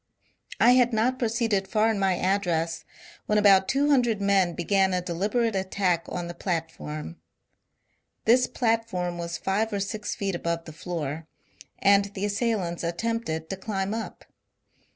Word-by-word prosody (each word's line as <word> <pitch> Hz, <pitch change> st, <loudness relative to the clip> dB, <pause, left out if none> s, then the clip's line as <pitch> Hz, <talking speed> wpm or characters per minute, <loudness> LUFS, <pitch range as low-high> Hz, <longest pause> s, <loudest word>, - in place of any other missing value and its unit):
I 240 Hz, -, +6 dB
had 250 Hz, -1 st, +4 dB
not 245 Hz, +4 st, +1 dB
pro 235 Hz, -, +1 dB
ceeded 220 Hz, -4 st, 0 dB
far 215 Hz, +2 st, +2 dB
in 210 Hz, -, -2 dB
my 190 Hz, -2 st, +2 dB
address 170 Hz, -4 st, 0 dB, 0.4 s
when 210 Hz, -, +2 dB
about 195 Hz, -2 st, +5 dB
two 285 Hz, +5 st, +2 dB
hundred 240 Hz, -6 st, +3 dB
men 195 Hz, -4 st, +2 dB
began 190 Hz, +1 st, +2 dB
a 180 Hz, -, 0 dB
deliberate 205 Hz, +6 st, -1 dB
attack 190 Hz, -2 st, 0 dB
on 175 Hz, -1 st, -4 dB
the 175 Hz, -, -6 dB
platform. 165 Hz, -2 st, -4 dB, 1.1 s
This 250 Hz, +3 st, +5 dB
platform 225 Hz, -7 st, -1 dB
was 170 Hz, 0 st, -4 dB
five 210 Hz, +4 st, -1 dB
or 200 Hz, -, -1 dB
six 205 Hz, +2 st, -3 dB
feet 195 Hz, -1 st, -2 dB
above 170 Hz, -1 st, -2 dB
the 160 Hz, -, -9 dB
floor 160 Hz, -2 st, -5 dB, 0.5 s
and 200 Hz, 0 st, +4 dB
the 195 Hz, +1 st, -2 dB
assailants 205 Hz, -5 st, -1 dB
attempted 170 Hz, -2 st, -2 dB
to -, -, -2 dB
climb 195 Hz, 0 st, -3 dB
up. 225 Hz, 0 st, -6 dB
195 Hz, 150 wpm, -26 LUFS, 175-220 Hz, 1.1 s, I